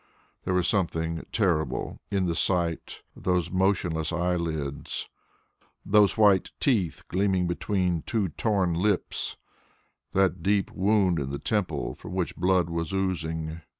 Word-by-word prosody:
There 95 - 0
was 90 -2 +2
something 85 -4 0
terrible 90 -8 0
in 100 -3 +1
the 85 - 0
sight 85 -1 -1
of - - -13
those 90 -2 0
motionless 90 -4 +1
eyelids, 85 -5 -2 0.8
those 105 0 +4
white 100 -3 +5
teeth 105 - +1
gleaming 95 -1 +1
between 90 -1 0
two 105 -1 -1
torn 95 0 0
lips, 95 +3 -1 0.8
that 95 -2 +2
deep 100 +2 +1
wound 95 -3 +2
in 70 -1 -3
the 70 - -3
temple 90 -6 -1
from - - -10
which 90 -3 -1
blood 90 -1 +2
was 85 -1 -3
oozing. 80 -4 -2
90 Hz, 130 wpm, -27 LUFS, 85-95 Hz, 0.8 s, white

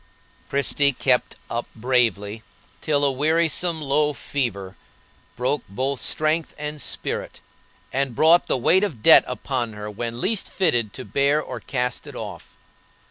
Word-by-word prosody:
Christie 140 0 +1
kept 125 0 +1
up 120 +1 -3
bravely 115 -3 0 0.4
till 145 -2 +2
a 140 - +3
wearisome 160 +4 +1
low 150 +1 +1
fever 100 -10 -3 0.6
broke 125 +3 0
both 130 +6 -2
strength 155 +1 -1
and 150 0 -5
spirit, - - -4 0.5
and 135 -2 0
brought 165 +6 +5
the - - +1
weight 180 +10 +3
of 145 - -3
debt - - +9
upon 125 -2 -3
her 105 0 -7
when 115 +2 -5
least 200 - 0
fitted 120 - +1
to 130 - -7
bear 140 +2 +2
or 125 -5 -6
cast 125 +4 -2
it 145 - -9
off. 100 -8 -8
135 Hz, 140 wpm, -23 LUFS, 120-150 Hz, 0.6 s, debt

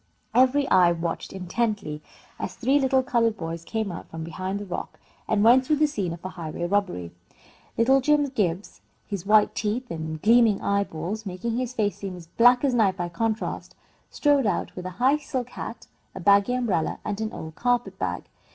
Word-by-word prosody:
Every 260 +2 +4
eye 175 -2 +6
watched 165 0 -4
intently, 190 -4 -2 0.4
as - - -4
three 270 +4 +2
little 265 -1 +2
coloured 230 -3 +1
boys 165 -1 -5
came 220 +1 -3
out 170 - -8
from 160 0 -6
behind 185 +4 -4
the 205 - -6
rock 185 - -6 0.3
and 210 -1 +2
went 245 +3 +6
through 300 +4 +2
the 305 +1 +3
scene 205 - -2
of 170 +2 -8
a - - -2
highway 170 -1 -6
robbery. 180 - -1 0.7
Little 265 +4 +4
Jim 295 +2 +3
Gibbs, 200 -6 -2 0.2
his 200 -2 -5
white 210 0 +5
teeth 225 +4 -2
and 160 -1 -4
gleaming 225 +1 +4
eyeballs 200 +1 -2
making 195 +5 -3
his 255 0 -3
face 205 -3 0
seem 195 -2 -6
as 175 -2 -11
black 245 - +4
as 275 -3 +2
night 205 -5 +2
by 175 -1 -3
contrast, 220 +5 -3 0.3
strode 285 -5 +2
out 190 - -2
with 180 0 -5
a 185 0 -9
high 265 +5 +4
silk 260 -4 -4
hat, - - -7 0.3
a - - -6
baggy 200 +6 +4
umbrella, 210 -10 0
and 210 +1 -3
an 220 0 -2
old 160 0 -8
carpet 245 +6 -1
bag. - - -2
210 Hz, 190 wpm, -25 LUFS, 180-245 Hz, 0.7 s, eye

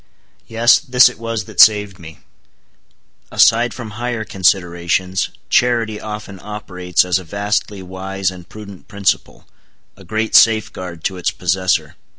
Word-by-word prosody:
Yes, 115 +2 +4
this 130 -4 +5
it 125 - -13
was 115 -1 -3
that 110 - -12
saved 105 -3 +4
me. 80 -2 -13 1.1
Aside 115 +1 +4
from 115 -3 -8
higher 120 0 -4
considerations, 90 -1 0 0.2
charity 115 -3 +1
often 105 -2 -8
operates 90 -4 -2
as 90 0 +1
a - - -10
vastly 100 +2 -3
wise 95 +1 -4
and 90 -2 -13
prudent 100 -3 -12
principle—a 100 -1 -5
great 110 +4 -3
safeguard 95 -6 +2
to 95 - -2
its 90 - -1
possessor. 90 0 -1
100 Hz, 130 wpm, -17 LUFS, 90-110 Hz, 1.1 s, this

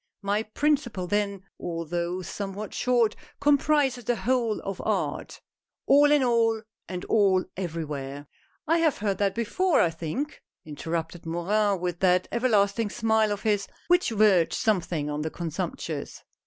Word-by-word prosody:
My 200 +2 +1
principle 240 -3 0
then, 200 0 -1 0.2
although 170 +1 -3
somewhat 200 +2 -5
short, 240 -3 +2 0.2
comprises 285 -3 +2
the 240 +2 0
whole 235 -3 0
of 195 -2 -5
art: - - -2 0.2
" - - -65
All 290 +1 +6
in 295 -2 +4
all 230 -2 +2
— - - -61
and 180 -1 -5
all 195 -4 +3
everywhere! 150 -6 -5 0.2
" - - -41
"I 330 +2 +3
have 320 -3 +2
heard 200 -3 -1
that 200 -2 +1
before, 330 - +1
I 170 - +3
think," 170 - -4 0.2
interrupted 165 +2 -4
Morin, 195 +4 +1
with 175 -1 -2
that 180 -1 +3
everlasting 220 -3 +2
smile 220 -1 +1
of 205 0 -3
his, 205 -2 +1 0.2
which 355 0 +4
verged 205 -6 +4
sometimes 175 -9 0
on 150 0 -2
the 160 - -2
contemptuous. 165 -3 -5
205 Hz, 150 wpm, -26 LUFS, 175-235 Hz, 0.2 s, All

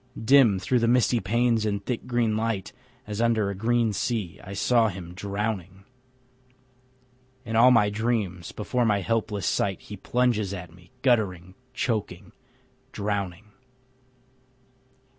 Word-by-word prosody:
Dim 115 -3 +5
through 120 +7 +1
the 115 - +1
misty 120 0 +3
panes 115 +2 +1
and 100 -2 -2
thick 125 0 -3
green 120 -3 +1
light, 110 -3 -2 0.3
As 105 +1 -4
under 110 -4 +2
a - - -5
green 115 +2 +1
sea, 105 -5 -2
I 100 - -8
saw 115 +3 +3
him 90 -4 -7
drowning. 100 -1 -4 1.6
In 115 -1 -4
all 120 +3 +7
my 110 -5 +4
dreams 105 -6 -2
before 120 +4 -1
my 105 -3 +2
helpless 105 -2 -1
sight 95 -1 0
He 105 - -10
plunges 110 -1 0
at 90 -3 -9
me, 90 0 -19
guttering, 95 -8 +1 0.2
choking, 105 -9 -3 0.6
drowning. 100 -1 -4
105 Hz, 130 wpm, -26 LUFS, 95-115 Hz, 1.6 s, all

